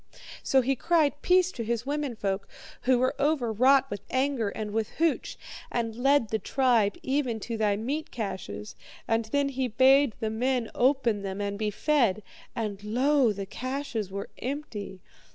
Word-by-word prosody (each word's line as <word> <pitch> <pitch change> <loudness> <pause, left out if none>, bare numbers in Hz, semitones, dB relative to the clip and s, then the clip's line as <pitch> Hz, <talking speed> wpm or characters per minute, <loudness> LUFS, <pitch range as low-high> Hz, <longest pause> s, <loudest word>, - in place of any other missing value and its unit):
So 265 - +3
he 270 +2 +1
cried 300 -1 +1
peace 365 0 +4
to 235 - -5
his 235 +1 -2
womenfolk, 235 -9 -2 0.4
who 255 0 +4
were 255 +1 +1
overwrought 270 -2 +3
with 205 -1 -4
anger 260 -4 0
and 210 +1 -5
with 220 0 -1
hooch, 330 -1 0 0.3
and 230 -2 -2
led 270 -1 +3
the 220 - 0
tribe 235 -4 +2
even 260 -4 0
to 230 - -4
thy 210 -2 +1
meat 280 +9 -3
caches. 140 - -5 0.3
And 225 0 +1
he 275 0 0
bade 260 +1 +4
the 220 -2 -2
men 245 +1 0
open 245 -5 +2
them 195 0 -4
and 200 0 -2
be 210 +1 -1
fed. 225 -4 +1 0.3
And 210 -4 -4
lo, 255 +3 +3
the 200 -1 -5
caches 255 -1 -4
were 200 +1 -5
empty. 230 -8 -5
240 Hz, 155 wpm, -27 LUFS, 215-275 Hz, 0.4 s, peace